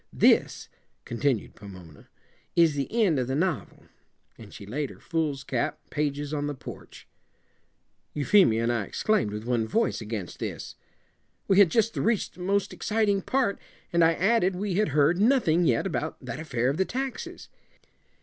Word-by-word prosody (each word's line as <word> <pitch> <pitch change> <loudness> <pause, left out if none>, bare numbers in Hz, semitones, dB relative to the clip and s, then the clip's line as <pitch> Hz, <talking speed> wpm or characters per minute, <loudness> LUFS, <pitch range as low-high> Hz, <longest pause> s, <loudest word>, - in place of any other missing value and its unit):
This," - - +3 0.4
continued 120 -1 -1
Pomona, 90 -7 -13 0.5
"is 165 -3 +5
the 140 -1 -3
end 205 - +2
of 125 - -1
the 130 - -1
novel," 160 - -2 0.5
and 105 -3 -13
she 100 - -10
laid 135 +7 -3
her - - -13
foolscap 150 -3 -2
pages 145 0 -2
on 145 -1 -1
the 145 - -4
porch. - - -11 1.1
Euphemia 145 - +4
and 120 - +1
I 115 -4 -1
exclaimed, 215 - 0
with 105 +1 -6
one 120 -2 0
voice, 225 - 0
against 105 -5 -6
this. - - -5 0.7
We 195 0 +4
had 200 -4 +7
just 225 +4 +1
reached 225 -2 0
the - - -18
most 200 +2 0
exciting 210 -2 0
part, 250 -2 0 0.3
and 170 0 +4
I 165 0 +5
added 195 0 +2
we 195 +1 -2
had 210 +4 +2
heard 150 +4 +2
nothing 205 - +3
yet 120 -6 +2
about - - -3
that - - -5
affair 130 -5 0
of 145 - -4
the 190 - +2
taxes. 265 +3 -5
155 Hz, 160 wpm, -27 LUFS, 125-200 Hz, 1.1 s, had